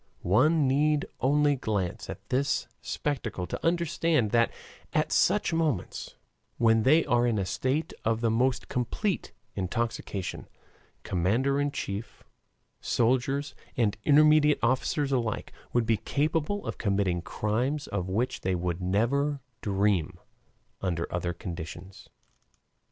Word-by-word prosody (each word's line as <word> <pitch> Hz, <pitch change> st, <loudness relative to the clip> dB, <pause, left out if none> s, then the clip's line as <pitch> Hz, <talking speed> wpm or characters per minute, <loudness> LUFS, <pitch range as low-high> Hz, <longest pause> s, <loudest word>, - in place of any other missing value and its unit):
One 145 Hz, -, +4 dB
need 150 Hz, +2 st, +2 dB
only 145 Hz, +2 st, +3 dB
glance 100 Hz, -8 st, -2 dB
at -, -, -8 dB
this 135 Hz, +2 st, 0 dB
spectacle 120 Hz, -10 st, -3 dB
to -, -, -6 dB
understand 165 Hz, -7 st, +1 dB
that 115 Hz, -1 st, +4 dB, 0.4 s
at -, -, +1 dB
such -, -, +3 dB
moments, 155 Hz, -, -1 dB, 0.4 s
when 115 Hz, -1 st, +4 dB
they 155 Hz, +8 st, +4 dB
are 120 Hz, 0 st, +3 dB
in 115 Hz, -3 st, +1 dB
a 95 Hz, -, 0 dB
state 130 Hz, -, -1 dB
of 115 Hz, 0 st, +1 dB
the 115 Hz, -1 st, +1 dB
most 125 Hz, +3 st, +1 dB
complete 170 Hz, -, -2 dB, 0.2 s
intoxication, 100 Hz, -1 st, -3 dB, 0.6 s
commander 120 Hz, +11 st, +1 dB
in 145 Hz, -, +1 dB
chief, 100 Hz, -3 st, -5 dB, 0.6 s
soldiers, 130 Hz, +4 st, +1 dB, 0.2 s
and 110 Hz, -5 st, +2 dB
intermediate 150 Hz, 0 st, +5 dB
officers 130 Hz, +3 st, +1 dB
alike, 120 Hz, -5 st, -1 dB, 0.2 s
would 120 Hz, -1 st, +2 dB
be 110 Hz, -1 st, +2 dB
capable 160 Hz, -, -1 dB
of -, -, -5 dB
committing 100 Hz, -4 st, +1 dB
crimes 125 Hz, -, -1 dB
of 95 Hz, -2 st, -3 dB
which 115 Hz, +7 st, -1 dB
they 95 Hz, 0 st, 0 dB
would 85 Hz, 0 st, -2 dB
never 130 Hz, +10 st, +1 dB, 0.2 s
dream 95 Hz, -4 st, +1 dB, 0.6 s
under 85 Hz, -3 st, -1 dB
other 90 Hz, 0 st, -1 dB
conditions. 85 Hz, 0 st, -8 dB
120 Hz, 125 wpm, -28 LUFS, 100-145 Hz, 0.6 s, intermediate